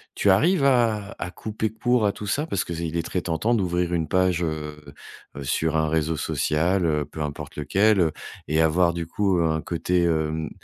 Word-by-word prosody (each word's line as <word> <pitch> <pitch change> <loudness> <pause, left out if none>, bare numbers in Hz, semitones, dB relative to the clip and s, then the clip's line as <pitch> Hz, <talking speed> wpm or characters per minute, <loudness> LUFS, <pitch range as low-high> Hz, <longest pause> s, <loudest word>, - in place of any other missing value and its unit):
tu 100 - +2
arrives 160 - +3
à 115 -6 +2
à - - -4
couper 110 +3 -4
court 120 +1 +1
à - - +2
tout 105 - -8
ça? 145 +10 -1
Parce 100 - -1
qu'il 85 -1 -4
est 85 - -1
très 90 - -2
tentant 90 +8 0
d'ouvrir 90 -4 0
une 80 -2 0
page, 90 0 +1
heu, 75 -2 -4 0.5
heu, 70 - -5
sur 80 +4 0
un 80 0 +1
réseau 80 0 0
social, 85 +6 0
heu, 75 -2 +1
peu 75 +2 -8
importe 75 -1 -6
lequel, 100 +8 +2
heu 80 -3 +3 0.4
et 80 +2 +1
avoir 85 +2 +3
du 85 -1 -3
coup 95 +2 0
un 80 -1 +1
côté 90 +2 0
hem, 80 -2 0
85 Hz, 195 wpm, -24 LUFS, 80-100 Hz, 0.5 s, arrives